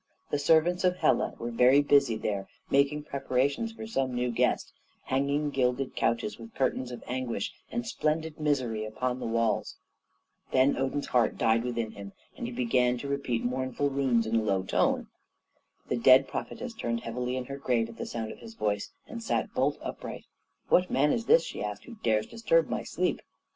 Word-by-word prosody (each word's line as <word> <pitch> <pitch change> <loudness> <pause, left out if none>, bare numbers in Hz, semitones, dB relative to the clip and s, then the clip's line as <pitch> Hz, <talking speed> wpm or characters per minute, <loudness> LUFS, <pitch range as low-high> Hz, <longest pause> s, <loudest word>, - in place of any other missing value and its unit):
The 145 - +1
servants 165 +5 +3
of 180 -1 +3
Hela - - +2
were 120 +1 -4
very 125 +4 +5
busy 140 -5 +4
there 100 -3 -2 0.2
making 140 +2 +3
preparations 140 - 0
for 225 - -7
some 135 - -1
new 125 0 0
guest 115 - 0 0.3
hanging 140 +2 0
gilded 130 0 0
couches 115 -1 0
with 115 0 -11
curtains 130 -1 0
of 125 - -8
anguish 125 -5 -3 0.2
and 240 0 -2
splendid 160 -6 -1
misery 130 -8 0
upon 125 +4 -2
the - - -3
walls. 115 -1 0 0.8
Then 130 +2 +4
Odin's 135 +2 -1
heart 120 -3 +2
died 115 +1 +3
within 115 -3 -2
him, 100 -2 -9 0.2
and 240 - -4
he - - -5
began 130 - +2
to 140 - -6
repeat 140 -4 -1
mournful 130 +3 -1
runes 130 -4 +2
in 110 +1 -1
a - - +3
low 100 -3 +1
tone. - - +1 0.8
The - - 0
dead 130 +3 +6
prophetess 250 -2 -5
turned 115 - -2
heavily 125 +2 -3
in 130 - -3
her 140 +2 -6
grave 120 -4 +1
at 115 0 -12
the - - -5
sound 110 -2 -4
of - - -11
his 225 0 -11
voice, 105 - -1 0.2
and 230 - -7
sat 225 - -1
bolt - - +1
upright. - - -6 0.4
"What 180 0 +4
man 145 +3 +3
is 230 - -2
this," 480 +2 +6
she - - -5
asked, - - -4
"who 245 - -10
dares 110 -2 +2
disturb - - +2
my - - -1
sleep?" - - -1
130 Hz, 185 wpm, -29 LUFS, 115-145 Hz, 0.8 s, dead